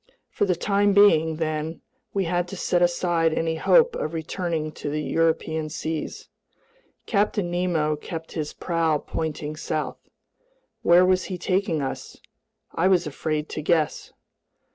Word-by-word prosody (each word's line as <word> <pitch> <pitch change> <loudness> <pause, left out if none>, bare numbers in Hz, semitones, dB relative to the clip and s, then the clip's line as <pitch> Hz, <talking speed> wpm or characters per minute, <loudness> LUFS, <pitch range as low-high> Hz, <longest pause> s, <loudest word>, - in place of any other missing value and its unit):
For - - +1
the 185 -2 +1
time 200 +2 +2
being, 165 -6 +5
then, 155 0 -3 0.3
we 195 - 0
had 175 0 0
to 195 - -7
set 175 0 +1
aside 170 -2 +2
any 165 0 0
hope 485 - +4
of 155 +2 -3
returning 160 -1 -3
to 145 -1 -5
European 160 0 0
seas. 160 0 -4 0.8
Captain 205 -3 0
Nemo 170 -4 +1
kept 165 +2 -7
his 155 -2 -3
prow 165 -3 0
pointing 150 0 -4
south. 155 0 -4 0.7
Where 175 +1 +6
was 185 -1 +2
he 185 - -4
taking 185 -4 0
us? 135 - -5 0.6
I 180 - +2
was 185 -2 +3
afraid 150 +1 -2
to - - -4
guess. 155 0 0
165 Hz, 140 wpm, -24 LUFS, 155-180 Hz, 0.8 s, Where